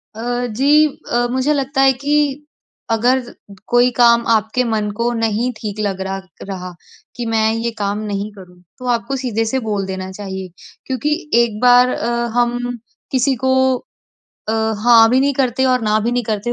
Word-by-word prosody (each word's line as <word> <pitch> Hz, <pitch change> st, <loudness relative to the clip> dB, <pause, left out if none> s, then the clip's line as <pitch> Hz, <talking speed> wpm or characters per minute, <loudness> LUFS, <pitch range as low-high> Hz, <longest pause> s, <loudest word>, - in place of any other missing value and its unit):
अ, 245 Hz, +2 st, -2 dB
जी। 280 Hz, +7 st, +4 dB, 0.3 s
अ, 240 Hz, 0 st, +2 dB
मुझे 260 Hz, +4 st, +1 dB
लगता 275 Hz, -1 st, 0 dB
है 270 Hz, 0 st, +5 dB
कि 290 Hz, +1 st, 0 dB, 0.5 s
अगर 245 Hz, +4 st, +2 dB, 0.5 s
कोई 245 Hz, +1 st, +4 dB
काम 235 Hz, -1 st, +4 dB
आपके 220 Hz, +3 st, +1 dB
मन 220 Hz, -3 st, -1 dB
को 235 Hz, +1 st, 0 dB
नहीं 225 Hz, +1 st, 0 dB
ठीक 210 Hz, -1 st, -6 dB
लग 195 Hz, -3 st, -2 dB
रहा 190 Hz, 0 st, -3 dB, 0.2 s
रहा 185 Hz, -2 st, -7 dB, 0.4 s
कि 240 Hz, -, -4 dB
मैं 220 Hz, -1 st, +1 dB
ये 230 Hz, +1 st, -2 dB
काम 205 Hz, 0 st, -2 dB
नहीं 200 Hz, +1 st, -3 dB
करूँ, 180 Hz, -3 st, -15 dB, 0.2 s
तो 255 Hz, -, -8 dB
आपको 240 Hz, +2 st, -1 dB
सीधे-से 240 Hz, -1 st, -1 dB
बोल 210 Hz, -4 st, -2 dB
देना 190 Hz, 0 st, -5 dB
चाहिए। 190 Hz, -1 st, -6 dB, 0.4 s
क्योंकि 265 Hz, +3 st, -1 dB, 0.3 s
एक 215 Hz, -3 st, -4 dB
बार 250 Hz, 0 st, +6 dB
अ, 235 Hz, -, -2 dB, 0.3 s
हम 245 Hz, 0 st, 0 dB, 0.3 s
किसी 265 Hz, +1 st, +2 dB
को 260 Hz, 0 st, +3 dB, 1.0 s
अ, -, -, +1 dB, 0.3 s
हाँ 230 Hz, -2 st, +7 dB
भी 255 Hz, +2 st, +3 dB
नहीं 280 Hz, +1 st, +2 dB
करते 260 Hz, -1 st, +1 dB
और 255 Hz, -1 st, +2 dB
ना 215 Hz, 0 st, +2 dB
भी 235 Hz, +3 st, -1 dB
नहीं 245 Hz, 0 st, 0 dB
करते, 215 Hz, +2 st, -2 dB
235 Hz, 170 wpm, -18 LUFS, 215-255 Hz, 1.0 s, हाँ